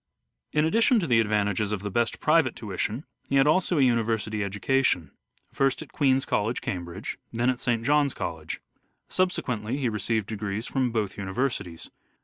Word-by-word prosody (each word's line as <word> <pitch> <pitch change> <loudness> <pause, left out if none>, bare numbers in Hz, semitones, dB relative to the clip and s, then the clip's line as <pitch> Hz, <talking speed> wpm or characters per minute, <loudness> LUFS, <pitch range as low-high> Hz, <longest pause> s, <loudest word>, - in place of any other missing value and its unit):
In 150 0 +2
addition 230 - +4
to 180 - -1
the 120 -6 +4
advantages 105 -1 +1
of 105 -2 -3
the 105 - -3
best 115 +3 0
private 155 -5 +3
The - - -11
tuition 105 - -3 0.2
he 140 - +1
had 135 0 +5
also 170 +2 +3
a 140 - +5
university 110 -3 +1
education; 100 - +1 0.4
first 135 +2 +1
at 155 - -17
Umversities. - - -23
Queens' 135 -1 +2
College, 110 +4 0
Cambridge, 90 +1 -5
then 120 +2 +2
at 125 - -5
St. 115 -2 0
John's 145 -1 +3
College. 80 -2 -5 0.5
Subsequently 125 - -1
he 130 -4 0
received 110 0 -1
degrees 105 +1 -4
from 130 -3 0
both 105 -4 -2
universities. 95 -4 -3
115 Hz, 170 wpm, -26 LUFS, 105-135 Hz, 0.5 s, had